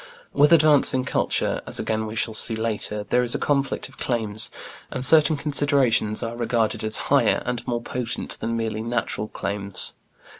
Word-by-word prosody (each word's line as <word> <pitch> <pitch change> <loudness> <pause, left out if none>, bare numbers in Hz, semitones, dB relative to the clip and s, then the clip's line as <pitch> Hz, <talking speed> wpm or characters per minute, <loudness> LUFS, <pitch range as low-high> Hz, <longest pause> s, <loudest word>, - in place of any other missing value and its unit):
With 145 +2 +4
advancing 150 -5 +5
culture - - 0
as - - -2
again 110 0 -2
we 110 - -7
shall 110 0 -1
see 110 +1 0
later 110 -1 -3
there 125 - +4
is 120 -1 0
a - - +1
conflict 140 -1 -1
of 135 0 -19
claims, 110 -3 -1 0.4
and 130 - -3
certain 155 +1 +6
considerations 140 -7 0
are 115 0 -4
regarded 115 -2 -1
as 110 0 -3 0.2
"higher" - - +3
and 120 -1 -4
more 120 -1 -2
potent 120 -1 -4
than 115 0 -2
merely 110 -1 -3
"natural" 115 -2 -3
claims. 100 -1 -3
120 Hz, 165 wpm, -23 LUFS, 110-135 Hz, 0.4 s, certain